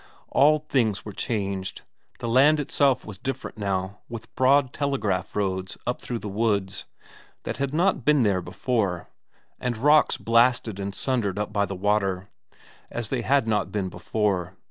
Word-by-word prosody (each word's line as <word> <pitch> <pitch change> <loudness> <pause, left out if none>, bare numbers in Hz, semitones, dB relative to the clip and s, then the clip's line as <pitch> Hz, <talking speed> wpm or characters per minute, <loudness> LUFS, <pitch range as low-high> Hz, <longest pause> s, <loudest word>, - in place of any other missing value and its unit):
All 150 +2 +5
things 110 -7 +1
were 105 - -7
changed, 100 -3 -3 0.3
the 120 - -5
land 140 +6 +5
itself 140 -2 +1
was 105 -3 -8
different 130 0 -5
now, 95 0 -2
with 115 -1 -8
broad 130 0 +3
telegraph 110 -11 -1
roads 95 -2 -2
up 125 - -2
through 120 - -4
the 105 - -7
woods, 100 -2 -1 0.6
that 110 - -4
had 140 0 -1
not 170 -2 +1
been 150 -1 +4
there 100 -4 +2
before, 95 0 -2 0.5
and 125 -2 -2
rocks 150 +6 +4
blasted 115 -3 +2
and 100 0 -4
sundered 115 -8 -1
up 105 0 -3
by 100 -1 +1
the 95 - -5
water, 100 -1 0 0.6
as 120 -2 -4
they 130 -3 -1
had 135 0 +2
not 105 -4 0
been 95 -2 -2
before. 95 0 -2
110 Hz, 160 wpm, -25 LUFS, 95-130 Hz, 0.6 s, All